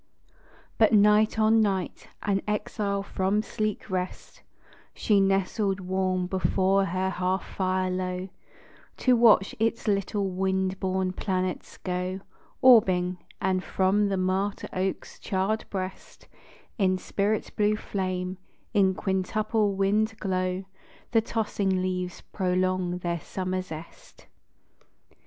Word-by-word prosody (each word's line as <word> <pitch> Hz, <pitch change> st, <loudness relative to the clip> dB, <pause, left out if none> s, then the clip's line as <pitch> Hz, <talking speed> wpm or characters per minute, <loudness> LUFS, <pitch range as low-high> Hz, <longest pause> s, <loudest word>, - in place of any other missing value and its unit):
But 220 Hz, 0 st, +5 dB
night 210 Hz, +1 st, +5 dB
on 220 Hz, +1 st, +4 dB
night, 195 Hz, -4 st, -1 dB, 0.2 s
an 195 Hz, -1 st, +1 dB
exile 210 Hz, -1 st, -1 dB
from 195 Hz, +2 st, 0 dB
sleek 215 Hz, -1 st, -3 dB
rest, 185 Hz, -2 st, -5 dB, 0.5 s
She 205 Hz, -2 st, +3 dB
nestled 195 Hz, +1 st, +1 dB
warm 185 Hz, 0 st, -1 dB
before 190 Hz, +1 st, +2 dB
her 185 Hz, +1 st, -1 dB
hearth 185 Hz, +1 st, -1 dB
fire 185 Hz, -1 st, -1 dB
low, 185 Hz, 0 st, -3 dB, 0.7 s
To 255 Hz, -1 st, +4 dB
watch 225 Hz, -5 st, +5 dB
its 225 Hz, +1 st, 0 dB
little 200 Hz, 0 st, 0 dB
wind 190 Hz, 0 st, -1 dB
born 185 Hz, -1 st, -1 dB
planets 185 Hz, -2 st, -3 dB
go 185 Hz, +1 st, -3 dB, 0.4 s
Orbing; 185 Hz, -8 st, +5 dB, 0.2 s
and 185 Hz, 0 st, 0 dB
from 195 Hz, +3 st, +2 dB
the 195 Hz, -, 0 dB
martyr 190 Hz, +2 st, -1 dB
oak's 185 Hz, +1 st, -3 dB
charred 200 Hz, +2 st, -1 dB
breast, 185 Hz, -1 st, -6 dB, 0.5 s
In 185 Hz, -2 st, +3 dB
spirit 205 Hz, +3 st, -1 dB
blue 210 Hz, 0 st, +2 dB
flame, 185 Hz, -2 st, -3 dB, 0.3 s
in 190 Hz, -3 st, +3 dB
quintuple 205 Hz, +2 st, 0 dB
wild 210 Hz, +3 st, +1 dB
glow, 185 Hz, -1 st, -1 dB, 0.5 s
The 225 Hz, -2 st, +4 dB
tossing 205 Hz, -4 st, -1 dB
leaves 180 Hz, -1 st, -3 dB
prolong 185 Hz, -1 st, -1 dB
their 175 Hz, -1 st, -2 dB
summer 185 Hz, +3 st, -3 dB
zest. 165 Hz, -2 st, -11 dB
190 Hz, 115 wpm, -27 LUFS, 185-205 Hz, 0.7 s, But